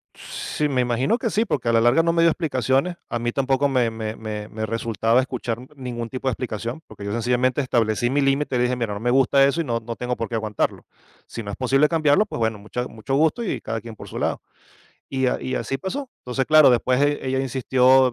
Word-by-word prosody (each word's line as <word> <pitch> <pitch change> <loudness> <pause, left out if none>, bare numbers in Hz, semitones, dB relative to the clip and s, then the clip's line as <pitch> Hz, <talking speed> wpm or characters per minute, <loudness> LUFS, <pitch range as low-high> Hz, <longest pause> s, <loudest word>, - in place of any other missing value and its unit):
Sí, 150 - -3
me 130 -3 +1
imagino 125 - +1
que 230 - -1
sí, 220 +3 +1
porque 115 - -1
a - - +4
la 115 - +4
larga 120 +7 +5
no 165 0 +1
me 165 0 +3
dio 165 - +6
explicaciones. 140 +2 0
A 120 - -2
mí 120 0 -1
tampoco 135 +1 +1
me 125 -4 +2
me 110 0 -5
me 105 -1 -6
me 110 0 -4
resultaba 115 +2 +1
escuchar 120 -3 -4 0.2
ningún 120 -4 -5
tipo 130 0 -5
de - - +3
explicación 120 +4 -4
porque 100 - -10
yo 100 - -3
sencillamente 125 +4 +1
establecí 120 -2 +1
mi 140 +2 +1
límite 135 0 +1
y - - +2
le 120 - +2
dije: 125 +1 +1
"Mira, 115 -4 -2
no - - -5
me 120 +2 0
gusta 135 +1 +4
eso 155 +5 +1
y - - -1
no, 115 -4 -1
no 115 +1 -6
tengo 125 0 -3
por 115 - -3
qué 115 - -4
aguantarlo. 110 -2 -2 0.4
Si 115 - -6
no 100 - -5
es - - -7
posible 135 +3 +3
cambiarlo. 155 +3 +3
Pues, 210 - -6
bueno, 110 -1 0
mucha 125 +4 -5
mucho 115 +4 -4
gusto 160 +10 +2
y 135 - -3
cada 115 - -4
quien 115 -2 -9
por - - -11
su - - -7
lado". - - -1 0.7
Y 130 -1 0
a - - 0
y 130 - -3
así 135 - -2
pasó. 255 - -5
Entonces, 125 +1 -2
claro, 155 -3 +7
después 125 +2 +2
e 145 -2 +1
ella 130 0 0
insistió, 130 0 +3
125 Hz, 245 wpm, -23 LUFS, 115-135 Hz, 0.7 s, claro